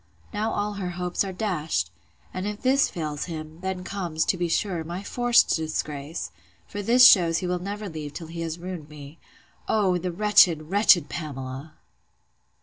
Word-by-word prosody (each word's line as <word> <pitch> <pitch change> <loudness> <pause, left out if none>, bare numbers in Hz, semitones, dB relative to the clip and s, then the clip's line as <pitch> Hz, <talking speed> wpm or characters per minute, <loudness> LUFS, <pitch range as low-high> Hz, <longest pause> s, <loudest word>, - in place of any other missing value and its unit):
Now 215 +2 -1
all 205 0 -2
her 180 - -2
hopes 180 +1 -1
are 195 - -4
dashed! 165 - -2 0.4
And 185 +2 -3
if 210 0 -6
this 270 +2 +3
fails 155 -5 -4
him, 155 -1 -7
then 190 -1 -3
comes, 175 -5 -2
to - - +1
be 175 -1 -1
sure, 175 0 -1
my 175 +4 -6
forced 245 +2 +3
disgrace! 155 - -4 0.3
for 205 - -6
this 245 +5 +6
shews 170 -4 +5
he 185 - -3
will 180 0 -1
never 205 +3 -5
leave 155 -4 -7
till 165 - -7
he 165 +1 -7
has 165 0 -3
ruined 175 -4 -7
me—O, 165 +6 -3
the 180 0 -3
wretched, 175 -5 +4
wretched 195 -6 +5
Pamela! 140 -2 -6
175 Hz, 165 wpm, -25 LUFS, 155-200 Hz, 0.4 s, this